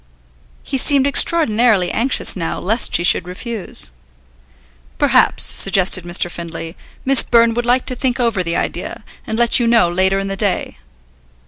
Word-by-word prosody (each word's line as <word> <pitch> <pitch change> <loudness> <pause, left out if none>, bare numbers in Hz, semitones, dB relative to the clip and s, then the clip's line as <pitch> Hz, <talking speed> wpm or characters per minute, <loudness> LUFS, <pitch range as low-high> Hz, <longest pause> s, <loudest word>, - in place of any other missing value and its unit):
He 270 - -3
seemed 275 0 +2
extraordinarily 235 - +2
anxious, 255 +4 0
now, 170 -4 -4
lest 225 +5 +1
she 175 - +1
should 175 - +1
refuse. 195 - -6 1.1
"Perhaps," - - +1
suggested 190 -2 +2
Mr. 175 0 0
Findlay, 165 -1 -8 0.3
"Miss 270 0 +6
Byrne 230 -1 +2
would 240 +1 -4
like 250 +1 +1
to 255 - 0
think 255 0 -3
over 230 -6 -1
the 170 -1 -4
idea, - - -5 0.2
and 220 - -4
let 240 +1 +3
you 240 - -1
know 230 -7 +2
later 190 +2 0
in 195 0 -4
the 195 - -4
day." 200 -1 -3
220 Hz, 155 wpm, -16 LUFS, 180-240 Hz, 1.1 s, Miss